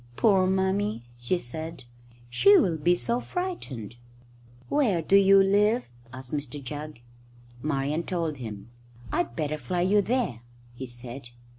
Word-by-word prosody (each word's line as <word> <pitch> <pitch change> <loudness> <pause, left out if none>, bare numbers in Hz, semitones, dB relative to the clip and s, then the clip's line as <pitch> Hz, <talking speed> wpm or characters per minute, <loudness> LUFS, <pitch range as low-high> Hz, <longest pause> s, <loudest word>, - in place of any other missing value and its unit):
"Poor 190 - +4
Mummy!" 190 - 0
she 120 +9 -1
said; 160 0 -7 0.4
"she 395 - +6
will 185 - +2
be 175 +4 +3
so 235 +7 0
frightened." 150 - -5 0.7
"Where 240 -12 +2
do 165 +4 +2
you 195 0 +7
live?" 210 +5 +3 0.3
asked 130 +1 -10
Mr 145 -1 -4
Jugg. 145 -1 -7 0.6
Marian 145 +2 -1
told 165 -4 -2
him. 110 -2 -8 0.4
"I'd 115 - -1
better 155 +1 -2
fly 180 +1 -2
you 200 +3 +4
there," 200 - -1 0.3
he 130 +2 -7
said. 120 +1 -8
160 Hz, 135 wpm, -27 LUFS, 130-195 Hz, 0.7 s, you